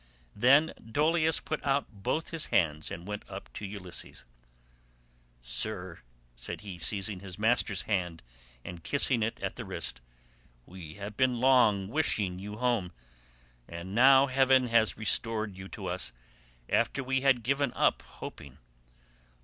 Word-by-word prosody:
Then 140 +8 +5
Dolius 155 +7 +2
put 155 - -4
out 140 0 +1
both 110 +10 -3
his 165 -2 -1
hands 80 -4 +1
and 85 +1 -7
went 105 0 -4
up 95 0 -9
to 105 - -5
Ulysses. 95 -9 -8 1.2
"Sir," 90 - -3 0.4
said - - -6
he, 95 -4 -8
seizing 100 +2 -1
his 95 -2 -9
master's 110 -3 +1
hand 90 -6 -2 0.4
and 85 -2 -8
kissing 135 -4 +2
it 110 +1 -1
at - - -3
the - - -4
wrist, 60 - -4 0.6
"we 85 -4 -10
have 100 +1 -8
long 125 -5 +4
been 105 - -10
wishing 105 -12 0
you 105 +2 -7
home: 120 -7 0 0.8
and 85 +3 -7
now 135 +4 +7
heaven 130 -1 +3
has 115 -2 +3
restored 110 -2 0
you 95 0 -8
to - - -8
us 60 - -2 0.6
after 140 - +1
we 135 +1 0
had 130 -3 +3
given 140 +2 +1
up - - +2
hoping. 70 -2 -10
110 Hz, 140 wpm, -30 LUFS, 95-130 Hz, 1.2 s, now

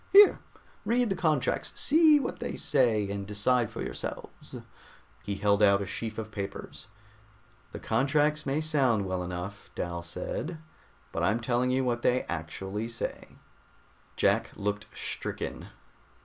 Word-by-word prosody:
Here, 405 +1 +8 0.4
read 235 +1 +1
the - - +1
contracts, 155 -7 0
see 310 0 +6
what 260 - -4
they - - -4
say 115 -8 +2
and 100 -1 -4
decide 115 +3 +2
for - - -5
yourselves." - - -6 0.7
He 100 - -3
held 100 +1 +2
out 100 -1 +6
a 100 - -3
sheaf 110 +3 -5
of 110 -1 -5
papers. 100 -2 -6 0.8
"The - - -6
contracts 145 +5 +1
may 140 +2 0
sound 135 -10 +2
well 95 -1 -2
enough," 90 +3 -6
Dal 85 -1 -3
said, 90 - -5 0.5
"but - - -3
I'm 105 +4 +2
telling 120 +1 +1
you 130 +1 +2
what 120 -1 0
they 125 +1 +2
actually 95 +7 -4
say." 115 - -6 0.8
Jack - - +2
looked 105 +1 -3
stricken. - - -5
115 Hz, 140 wpm, -29 LUFS, 100-145 Hz, 0.8 s, Here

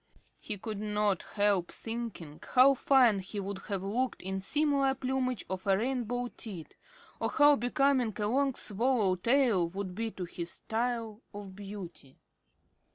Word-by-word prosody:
He 210 - -4
could 210 +1 -5
not 210 -2 0
help 200 -4 +1
thinking 225 -10 -6 0.2
how 260 +2 +8
fine 255 -6 +4
he 190 +2 -5
would 200 0 -4
have 195 -3 -2
looked 240 +6 -1
in 190 +1 -2
similar 280 +3 +2
plumage 255 -4 -2
of 190 +1 -5
a 195 -1 +4
rainbow 245 +1 -2
tint, 190 -11 -8 0.4
or - - 0
how 290 -1 +6
becoming 250 -2 +1
a 210 - 0
long 270 +3 +1
swallow 215 -2 +1
tail 230 -4 +2
would 190 0 -5
be 225 +4 -2
to 185 -4 -6
his 170 0 -5
style 230 0 -3
of 200 -2 -8
beauty. 195 -9 -9
215 Hz, 150 wpm, -30 LUFS, 195-255 Hz, 0.4 s, how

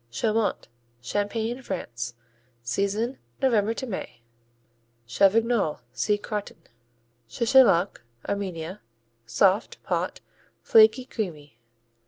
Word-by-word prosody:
Chaumont 215 - -1 0.3
Champagne, 220 - -2
France 120 - -5 0.5
Season 200 - -1 0.2
November 225 -4 +2
to 260 - -4
May. 185 - -7 0.8
Chavignol 200 - +2
see 210 +10 +1
Crottin. 205 0 -5 0.7
Chechaluk 225 - +4 0.3
Armenia 185 -2 -4 0.5
Soft; 190 - +2
pot; - - -2 0.4
flaky; 220 +3 +6
creamy. 150 - -6
205 Hz, 80 wpm, -26 LUFS, 160-225 Hz, 0.8 s, flaky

